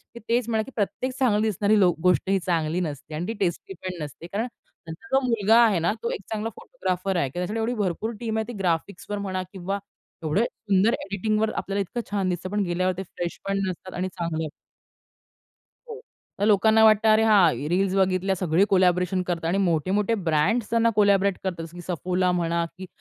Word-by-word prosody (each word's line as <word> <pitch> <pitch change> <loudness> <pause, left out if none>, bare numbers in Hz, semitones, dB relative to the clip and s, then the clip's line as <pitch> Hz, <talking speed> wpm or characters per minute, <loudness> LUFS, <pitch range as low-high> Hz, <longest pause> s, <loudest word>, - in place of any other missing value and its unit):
ते - - -7
तेच 235 0 +2
म्हणाले 220 -1 +1
की 270 - -12
"प्रत्येक 235 +5 -1
चांगली 220 -6 +3
दिसणारी 210 +1 +2
लो 185 -3 +5
गोष्ट 180 +1 +2
ही 195 0 +3
चांगली 170 -1 0
नसते 150 -1 -5
आणि 170 +4 -3
ती 225 - -2
टेस्टी 185 0 -2
पण 180 -3 -5
नसते." 150 +4 -9
कारण 210 +6 -2 0.4
त्यांचा 160 +9 -10
जो - - +6
मुलगा 225 -1 +4
आहे 205 -6 +2
ना 170 +3 +1
तो 235 - 0
एक - - -5
चांगला 220 +1 -2
फोटोग्राफर 190 -4 -3
आहे 140 -6 0
की - - -20
त्याच्यासाठी 200 +5 -2
एवढी 225 +2 0
भरपूर 195 +5 -2
टीम 225 -2 -2
आहे 220 - -1
ती 240 - -6
ग्राफिक्सवर 185 +3 -2
म्हणा 190 -2 -3
किंवा 195 +2 -3 0.4
एवढं 160 +8 +1
सुंदर 210 -1 +1
एडिटिंगवर 215 +2 0
आपल्याला 200 +1 -2
इतकं 235 +6 -4
छान 195 -2 0
दिसतं 180 +1 -3
पण 205 0 0
गेल्यावर 185 +1 0
ते 190 - -3
फ्रेश 175 -1 -6
पण 195 0 0
नसतात 185 0 -6
आणि 185 +1 -2
चांगलं 160 -2 -2 1.4
हो. 450 0 -7 0.4
तर 205 - +1
लोकांना 220 +1 +5
वाटतं 220 0 +5
अरे 215 0 +5
हां 185 -9 +4
रील्स 190 +3 +1
बघितल्या 190 0 +2
सगळे 180 +1 +2
कोलॅबोरेशन 180 -1 +2
करतात 170 -2 -2
आणि 185 +4 +1
मोठे-मोठे 195 +4 +1
ब्रँड्स 200 +10 +1
त्यांना 230 0 +3
कोलॅबोरेट 200 -2 +3
करतात. 175 -3 -3
जसं 165 +2 -12
की 175 - -8
Suffola 180 +2 0
म्हणा 170 0 0
की 185 - -7
190 Hz, 195 wpm, -25 LUFS, 175-215 Hz, 1.4 s, जो